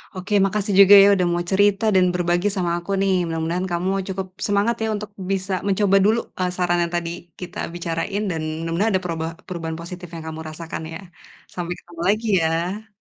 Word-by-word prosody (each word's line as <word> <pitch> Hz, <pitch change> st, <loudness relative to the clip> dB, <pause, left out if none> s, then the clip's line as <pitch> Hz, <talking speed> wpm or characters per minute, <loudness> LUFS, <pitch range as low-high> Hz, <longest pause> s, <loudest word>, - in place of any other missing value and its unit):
Oke, 185 Hz, +3 st, -5 dB
makasih 205 Hz, +1 st, -1 dB
juga, 200 Hz, 0 st, +9 dB
ya, -, -, +7 dB
udah 180 Hz, -2 st, +1 dB
mau 175 Hz, 0 st, 0 dB
cerita 200 Hz, +1 st, +3 dB
dan 185 Hz, -1 st, +5 dB
berbagi 175 Hz, +2 st, +1 dB
sama 180 Hz, -3 st, 0 dB
aku, 175 Hz, +3 st, -7 dB
nih. 195 Hz, 0 st, +2 dB, 0.2 s
Mudah-mudahan 165 Hz, +3 st, -2 dB
kamu 175 Hz, +2 st, 0 dB, 0.2 s
cukup 190 Hz, 0 st, -4 dB, 0.2 s
semangat, 205 Hz, +3 st, +2 dB
ya, -, -, 0 dB
untuk 210 Hz, -1 st, -6 dB, 0.2 s
bisa 195 Hz, 0 st, -1 dB
mencoba 195 Hz, 0 st, +3 dB
dulu, 220 Hz, +3 st, +4 dB, 0.2 s
eee, 180 Hz, 0 st, +1 dB
saran 175 Hz, -1 st, +1 dB
yang 170 Hz, 0 st, -4 dB
tadi 170 Hz, -1 st, -1 dB, 0.3 s
kita 180 Hz, -, -8 dB, 0.2 s
bicarain 175 Hz, +3 st, -2 dB
dan 160 Hz, -2 st, -3 dB, 0.2 s
mudah-mudahan 165 Hz, +7 st, 0 dB
ada 190 Hz, -, 0 dB
perubah 165 Hz, -2 st, -2 dB, 0.2 s
perubahan 165 Hz, -3 st, -4 dB
positif 175 Hz, +1 st, -8 dB
yang 165 Hz, -, -7 dB
kamu 160 Hz, 0 st, -6 dB
rasakan, 160 Hz, +1 st, -6 dB
ya. -, -, -6 dB, 0.5 s
Sampai 175 Hz, -1 st, -3 dB
ketemu 170 Hz, -1 st, -11 dB
lagi, 215 Hz, +3 st, +1 dB, 0.2 s
ya. 175 Hz, +7 st, -1 dB
180 Hz, 190 wpm, -22 LUFS, 170-195 Hz, 0.5 s, juga